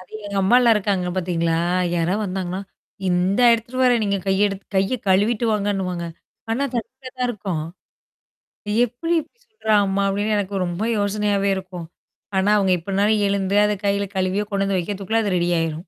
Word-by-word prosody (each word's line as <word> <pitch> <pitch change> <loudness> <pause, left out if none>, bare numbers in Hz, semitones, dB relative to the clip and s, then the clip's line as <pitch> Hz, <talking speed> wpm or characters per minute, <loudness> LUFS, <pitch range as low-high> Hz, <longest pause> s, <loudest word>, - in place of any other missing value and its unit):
அது 185 - -17
எங்க 200 -1 -5
அம்மாலாம் 235 +3 +5
இருக்காங்க 195 -3 -1
பார்த்தீங்களா? 170 -2 0 0.4
யாராவது 175 +5 0
வந்தாங்கன்னா? 185 0 -3 0.5
"இந்தா 185 +6 +2
எடுத்துட்டு 235 +3 -4
வாரேன். 245 -3 +4
நீங்க 200 -1 0
கைய 195 +2 +3
எடுத்து 195 0 -7
கைய 195 +7 +1
கழுவிட்டு 210 +5 +2
வாங்கன்னுவாங்க." 195 -4 -1 0.4
ஆனா 250 +5 0
தண்ணியா 255 +3 -5
தான் 250 - +1
இருக்கும். 190 -8 -4 1.2
எப்படி 250 +9 -3
இப்படி? 470 +10 -32
சொல்றாங்க 220 - +1
அம்மா? 195 +1 0
அப்டின்னு 205 +2 0
எனக்கு 195 -1 -1
ரொம்ப 175 +4 -3
யோசனையாவே 205 -1 0
இருக்கும். 185 -2 -7 0.5
ஆனா, 190 +2 +2
அவுங்க 195 -2 +2
எப்பனாலும் 200 +4 +1
எழுந்து 200 0 0
அத 210 - +1
கையில 200 0 +1
கழுவியோ 190 +2 0
கொண்டு 200 -1 0
வந்து 195 -1 0
வைக்கத்துக்குள்ள 205 +4 -1
அது 200 -3 0
ரெடி 175 0 0
ஆயிரும். 165 -1 -1
200 Hz, 160 wpm, -22 LUFS, 185-215 Hz, 1.2 s, அம்மாலாம்